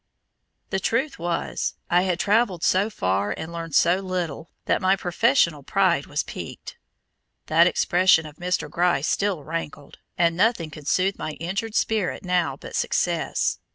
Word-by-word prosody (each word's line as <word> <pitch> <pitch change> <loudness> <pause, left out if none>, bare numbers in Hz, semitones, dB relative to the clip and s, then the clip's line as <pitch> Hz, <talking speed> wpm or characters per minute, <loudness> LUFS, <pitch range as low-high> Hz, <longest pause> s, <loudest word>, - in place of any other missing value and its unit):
The 190 - 0
truth 260 - -1
was, 170 0 -2
I 175 +1 +3
had 185 -1 -1
travelled 205 -4 +1
so 195 +4 +3
far 100 - -1
and 160 +1 -6
learned 165 -3 -5
so 175 +2 +4
little, 180 -5 -4 0.2
that - - +1
my 190 +1 +4
professional 170 -4 +2
pride 175 -1 +1
was 145 - -1
piqued. - - -8 0.7
That 165 +2 +5
expression 180 -2 +3
of 150 -1 -11
Mr. 180 +1 -1
Gryce 170 -5 +1
still 195 -7 0
rankled, 150 -2 -6 0.2
and 170 -1 +2
nothing 180 -5 +1
could 150 -2 -11
soothe 190 +4 +1
my 155 - -4
injured 195 +8 -4
spirit 210 -4 0
now 180 -2 0
but - - -9
success. - - 0
175 Hz, 155 wpm, -24 LUFS, 160-190 Hz, 0.7 s, That